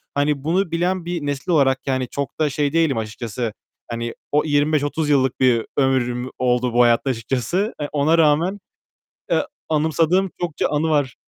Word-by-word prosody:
Hani, 145 -1 0
bunu 175 +3 0
bilen 175 +1 0
bir 170 -3 -3
nesil 145 +4 -3
olarak, 135 -4 +3
yani, 130 -2 0
çok 140 +2 -4
da 150 -1 +2
şey 145 +1 -1
değilim 160 -6 +2
açıkçası. 110 +1 -4 0.4
Hani, 115 0 -3 0.2
o 150 +1 +3
25-30 145 +1 +1
yıllık 130 -3 +2
bir 125 -3 +3
ömrüm 130 -2 +1
oldu 125 -1 +1
bu 120 - +5
hayatta 120 +3 +3
açıkçası. 130 - -1
E, 145 - -1
ona 150 +3 +2
rağmen, 165 +6 +2 0.7
eee, - - +2 0.2
anımsadığım 160 +4 +2
çokça 170 -4 -1
anı 150 +2 0
var. 145 -5 +1
145 Hz, 160 wpm, -21 LUFS, 125-160 Hz, 0.7 s, bu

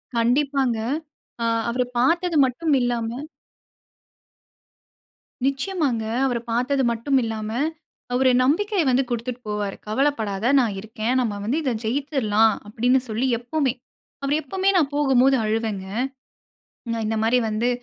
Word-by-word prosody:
கண்டிப்பாங்க. 260 0 +2 0.7
ஆ - - +1 0.3
அவர 250 +1 0 0.2
பார்த்தது 335 +6 +2
மட்டும் 280 +5 -1
இல்லாம 240 -2 0 2.4
நிச்சியமாங்க 275 - 0 0.2
அவர 245 -3 0
பார்த்தது 265 +3 +1
மட்டும் 265 +4 +1
இல்லாம 220 -1 -3 0.6
அவர் 260 +1 +4
நம்பிக்கைய 375 +8 +2
வந்து 260 +1 +3
குடுத்துட்டு 240 +1 -3
போவாரு. 210 -1 -2
கவலப்படாத 220 -3 0
நான் 225 -5 +1
இருக்கேன். 220 +4 -2
நம்ம 225 -4 -1
வந்து 250 +9 0
இத 260 - 0
ஜெயிச்சுரலாம் 225 -4 +2
அப்டின்னு 245 +5 +2
சொல்லி, 225 +4 -1
எப்பமே 260 +1 0 0.5
அவர் 280 +2 +1
எப்பமே 380 +7 0
நான் 295 -4 +2
போகும்போது 270 -2 +4
அழுவேங்க. 215 -3 -1 1.2
இந்த 220 +1 -1
மாரி 240 +3 +3
வந்து 225 +3 0
250 Hz, 115 wpm, -23 LUFS, 225-275 Hz, 2.4 s, அவர்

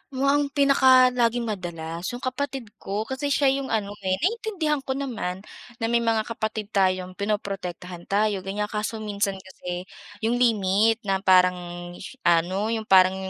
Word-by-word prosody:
mukhang 280 +2 +2
pinakalaging 255 -4 +5
madalas, 175 -5 -5
‘yong 245 - -7
kapatid 260 -3 -3
ko. 205 +2 -3
Kasi 265 +5 -3
siya 275 -1 +3
‘yong 275 0 -2
ano, 210 -3 -1
eh, 185 -1 +1
naiintindihan 375 -8 0
ko 265 -1 -3
naman, 210 -9 -4 0.3
na 225 - -2
may 235 - +4
mga 225 -2 +1
kapatid 220 -2 -4
tayong 185 -2 +1
pinoprotektahan 190 -4 -4
tayo, 205 0 +1
ganyan. 205 +2 -3
Kaso 215 +1 -2
minsan 200 -1 -1
kasi 180 -1 -7 0.4
‘yong 240 +2 +1
limit 220 0 +3
na 195 -1 0
parang 180 -2 +2
sh 235 - -9
ano, 180 +6 +2
‘yong 220 -1 -3
parang 185 0 +6
210 Hz, 150 wpm, -25 LUFS, 185-250 Hz, 0.4 s, parang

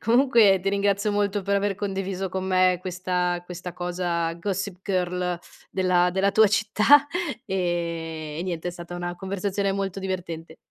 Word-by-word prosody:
comunque 230 -5 +5
ti 195 - -1
ringrazio 200 +1 +1
molto 205 -1 0
per 200 +1 0
aver 200 -1 +1
condiviso 195 -1 -3
con 190 +1 -3
me 185 -1 +3
questa 180 -1 -1
questa 180 0 -7
cosa 175 -2 -2
Gossip 195 +1 -3
Girl 180 -2 -1 0.3
della 180 -1 +2
della 195 +2 +1
tua 220 0 +6
città 215 +8 +4 0.4
e 170 -5 -2
e 170 - -2
niente, 175 -2 -4
è - - -2
stata 175 0 -8
una 175 0 -4
conversazione 195 +2 -2
molto 195 -1 -2
divertente. 170 -4 -5
185 Hz, 150 wpm, -25 LUFS, 175-200 Hz, 0.4 s, tua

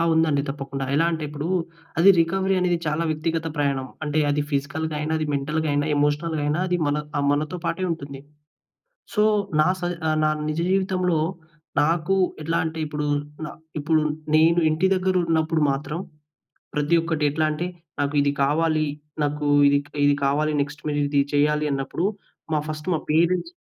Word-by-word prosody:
ఆ! - - +3
ఉందండి 155 -3 +2
తప్పకుండా. 135 -1 -4
ఎలా 155 +3 +3
అంటే 160 -2 -3
ఇప్పుడు, 150 +1 -5 0.5
అది 180 - +6
రికవరీ 190 +3 +1
అనేది 175 -1 +1
చాలా 155 +2 0
వ్యక్తిగత 160 +1 -1
ప్రయాణం. 140 -2 0 0.2
అంటే 150 0 -1
అది 145 +1 +1
ఫిజికల్‌గాయినా, 150 +2 -2
అది 155 - -1
మెంటల్‌గాయినా, 145 +1 0
ఎమోషనల్‌గాయినా, 150 +1 0
అది 180 - +2
మన 145 +1 +1 0.2
ఆహ్, 140 - +1
మనతో 155 +5 -2
పాటే 185 +3 -1
ఉంటుంది. 140 -4 -7 0.9
సో, 210 - +3 0.4
నా 155 - +4
స - - -15 0.4
నా 155 - +4 0.2
నిజ 155 +1 -2
జీవితంలో 185 -3 +1 0.6
నాకు 165 +4 +1 0.3
ఎట్లంటే 160 0 -1
ఇప్పుడు, 150 0 -3 0.4
నా 150 - -5 0.3
ఇప్పుడు 155 +1 +2 0.3
నేను 165 +2 +5
ఇంటి 160 +4 +2
దగ్గర 185 0 0
ఉన్నప్పుడు 160 -1 +1
మాత్రం 145 +3 -4 0.8
ప్రతి 150 +3 +1
ఒక్కటి 160 -2 -1
ఎట్లంటే 155 +3 0 0.3
నాకు 145 +1 0
ఇది 140 0 +2
కావాలి. 155 +2 +2 0.4
నాకు 150 0 -1 0.2
ఇది 140 0 +4
క్ - - -29 0.4
కావాలి. 150 +2 +1
నెక్స్ట్ 145 0 -4
మీరిది 145 -1 +1
చేయాలన్నప్పుడు 150 +1 +1 0.5
మా 155 - +3
ఫస్ట్ 155 +1 -5
మా - - +1
పేరెంట్స్ 175 - +2
155 Hz, 145 wpm, -24 LUFS, 145-165 Hz, 0.9 s, అది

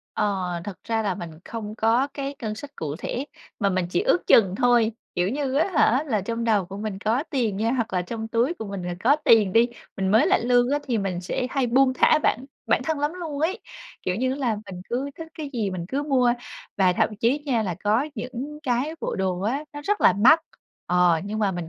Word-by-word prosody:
Ờ, 195 -4 0
thật 195 -2 -7
ra 225 -1 0
là 200 -3 -1
mình 175 -2 -7
không 215 -2 -6
có 235 +4 +3
cái 275 0 -4
ngân 215 -2 -2
sách 280 +5 -10
cụ 150 -1 -4
thể 255 +8 -4 0.3
mà 200 -3 +2
mình 185 -2 0
chỉ - - +1
ước 440 -6 +1
chừng 190 -5 +5
thôi. 240 -3 +3 0.2
Kiểu 180 +1 +1
như 270 +2 -2
á 315 +7 +2
hả 265 -1 +4
là 220 -6 0
trong 230 +4 -3
đầu 215 -4 +2
của 195 +2 -8
mình 205 -1 -4
có 225 +6 0
tiền 235 -9 0
nha, 225 +2 0
hoặc 235 -4 -1
là 180 -1 +1
trong 220 +4 -5
túi 240 +9 +1
của 220 - -7
mình 200 -2 -5
là 175 0 -3
có 280 +5 +5
tiền 210 -5 +5
đi, 230 +3 +5 0.3
mình 190 -1 -1
mới 220 +3 +5
lãnh - - +3
lương 245 +1 +3
á, 290 - +2
thì 235 -3 +1
mình 190 -3 -2
sẽ 185 +7 -2
hay 270 -2 0
buông 260 +2 +4
thả 305 - +4
bản 260 -4 0 0.2
bản - - +2
thân 320 -2 -1
lắm 295 +3 0
luôn 320 -5 -5
ấy. 370 +8 0 0.4
Kiểu 180 - -1
như 255 +6 0
á - - -4
là 240 -6 0
mình 185 -2 -8
cứ 265 +4 -2
thích 325 - -7
cái 300 -3 -5
gì 220 -6 -1
mình 180 -2 -4
cứ 275 +5 -1
mua, 260 -4 +3 0.4
và 185 -2 +4
thậm 210 +3 0
chí 235 +7 +2
nha 235 -5 +1
là 180 -4 -2
có 225 +8 +2
những 255 +5 -6
cái 255 +4 0
bộ - - -3
đồ 185 -1 -1
á, 260 +9 -1
nó 290 - -7
rất 415 +1 0
là - - +6
mắc, 250 - +6 0.5
ờ, 175 -2 +3
nhưng 215 +2 -4
mà 205 -2 +2
mình 175 -2 -5
230 Hz, 245 wpm, -24 LUFS, 195-270 Hz, 0.5 s, là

